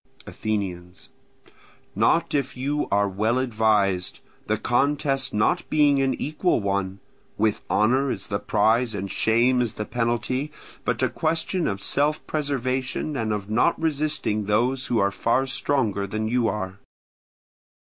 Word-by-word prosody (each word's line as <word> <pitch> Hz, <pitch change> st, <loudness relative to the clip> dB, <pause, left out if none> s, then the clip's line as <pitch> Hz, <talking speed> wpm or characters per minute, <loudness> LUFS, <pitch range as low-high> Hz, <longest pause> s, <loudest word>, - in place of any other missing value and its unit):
Athenians. 95 Hz, -4 st, -4 dB, 0.8 s
Not -, -, +2 dB
if 135 Hz, -2 st, -1 dB
you 145 Hz, +3 st, -1 dB
are 100 Hz, 0 st, +2 dB
well 110 Hz, +5 st, 0 dB
advised, 110 Hz, -7 st, +1 dB, 0.3 s
the -, -, +1 dB
contest 135 Hz, +1 st, +1 dB
not 105 Hz, 0 st, +1 dB
being 145 Hz, -2 st, +4 dB
an 135 Hz, -1 st, +1 dB
equal 155 Hz, +3 st, 0 dB
one, 100 Hz, -1 st, -2 dB, 0.4 s
with 110 Hz, -1 st, +1 dB
honour 130 Hz, +6 st, +2 dB
as 100 Hz, -5 st, -3 dB
the 100 Hz, -1 st, -2 dB
prize 110 Hz, +3 st, +2 dB
and 100 Hz, -1 st, -4 dB
shame 120 Hz, +5 st, +3 dB
as 115 Hz, -3 st, -2 dB
the 105 Hz, -, -4 dB
penalty, 120 Hz, +5 st, -1 dB, 0.3 s
but -, -, 0 dB
a -, -, +3 dB
question 165 Hz, +2 st, -1 dB
of 100 Hz, -1 st, -3 dB
self 150 Hz, +2 st, 0 dB
preservation 135 Hz, 0 st, -2 dB
and 110 Hz, -4 st, -1 dB
of 105 Hz, -2 st, -3 dB
not 115 Hz, +10 st, +2 dB
resisting 150 Hz, -9 st, -1 dB
those 120 Hz, +6 st, +1 dB
who 120 Hz, -, 0 dB
are 100 Hz, -1 st, +2 dB
far 120 Hz, +6 st, +1 dB
stronger 120 Hz, -7 st, 0 dB
than 110 Hz, +2 st, -2 dB
you 120 Hz, 0 st, +1 dB
are. 95 Hz, -2 st, -3 dB
115 Hz, 140 wpm, -24 LUFS, 105-135 Hz, 0.8 s, being